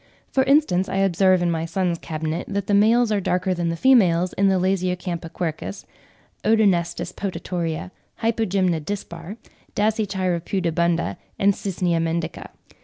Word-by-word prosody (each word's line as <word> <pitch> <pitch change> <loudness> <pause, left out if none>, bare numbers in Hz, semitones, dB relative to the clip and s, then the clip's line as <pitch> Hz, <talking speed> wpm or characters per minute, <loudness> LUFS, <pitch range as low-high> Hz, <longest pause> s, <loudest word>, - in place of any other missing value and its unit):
For 265 - +3
instance, 265 - +3
I - - -3
observe 190 -1 +3
in 175 - +1
my 165 -1 -1
son's 175 0 -1
cabinet 160 +1 -4
that 200 -1 -2
the 205 - -1
males 220 +3 +4
are 205 -2 +1
darker 185 +1 0
than 175 -1 -1
the 165 - -1
females 180 -6 +4
in 200 +1 +2
the 190 -1 +3
Lasiocampa 180 -2 -1
quercus, 155 - -4 0.6
Odonestis 185 -5 +2
potatoria, 175 -3 -4 0.3
Hypogymna 190 -7 +1
dispar, 175 +1 -6 0.4
Dasychira 200 -4 0
pudibunda, 170 - 0 0.2
and 200 +1 +3
Cycnia 180 -3 -1
mendica. 165 0 -3
180 Hz, 135 wpm, -23 LUFS, 170-200 Hz, 0.6 s, males